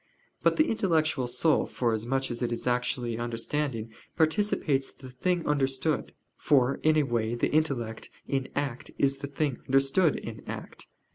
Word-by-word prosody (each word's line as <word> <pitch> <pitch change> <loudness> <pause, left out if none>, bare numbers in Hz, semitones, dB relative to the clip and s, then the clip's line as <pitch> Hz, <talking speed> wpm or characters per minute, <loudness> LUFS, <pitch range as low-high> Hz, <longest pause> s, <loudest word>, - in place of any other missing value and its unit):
But - - +3
the 310 0 +3
intellectual 160 - +1
soul 125 +6 +2
forasmuch 120 +3 -1
as 120 - -4
it 120 -1 0
is 120 - -3
actually 120 -1 0
understanding, 120 0 -2 0.2
participates 160 -5 +1
the 130 -2 -12
thing 175 +7 0
understood: 140 +1 0 0.2
for, 135 -2 +2
in 155 0 +4
a 150 - +4
way, 120 -3 0
the 120 - 0
intellect 130 -8 0 0.2
in 135 -1 -1
act 140 -4 -3
is 140 0 +2
the 140 +1 -5
thing 140 -2 -1
understood 135 +5 +3
in - - -6
act. - - -7
135 Hz, 150 wpm, -28 LUFS, 120-155 Hz, 0.2 s, in